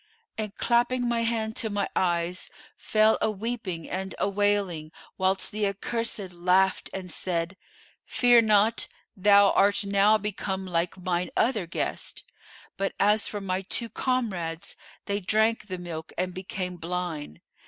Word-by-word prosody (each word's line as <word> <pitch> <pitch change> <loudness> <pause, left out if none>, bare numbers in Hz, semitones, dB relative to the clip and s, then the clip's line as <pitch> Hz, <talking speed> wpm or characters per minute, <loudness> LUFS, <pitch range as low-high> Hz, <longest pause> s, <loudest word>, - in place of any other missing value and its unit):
and 215 -1 -4
clapping 245 +1 +2
my 235 -1 +1
hand 225 -1 -1
to 220 - -1
my 205 -1 -1
eyes, 175 0 0 0.3
fell 215 0 +3
a - - +2
weeping 215 -5 -4
and 190 +1 -4
a - - +1
wailing, 200 -6 0 0.3
whilst 190 +1 +1
the 210 -1 0
accursed 200 -1 -3
laughed 185 +2 +2
and 185 -2 -6
said, 170 0 -1 0.5
'Fear 245 -1 +5
not, 215 +1 +3 0.3
thou 200 0 +6
art 200 +1 +3
now 200 +2 +4
become 195 -2 -3
like 175 0 -1
mine 180 -1 -1
other 220 -7 +2
guests.' 170 - -3 0.5
But, 195 0 -1
as 210 +2 +3
for 205 - -4
my 185 -1 -1
two 230 +4 -1
comrades, 190 -13 -2 0.3
they 200 0 -1
drank 220 +3 +1
the 185 -2 -4
milk 165 -3 -7
and 180 0 -1
became 185 -1 -4
blind. 170 - -4
195 Hz, 145 wpm, -27 LUFS, 180-215 Hz, 0.5 s, thou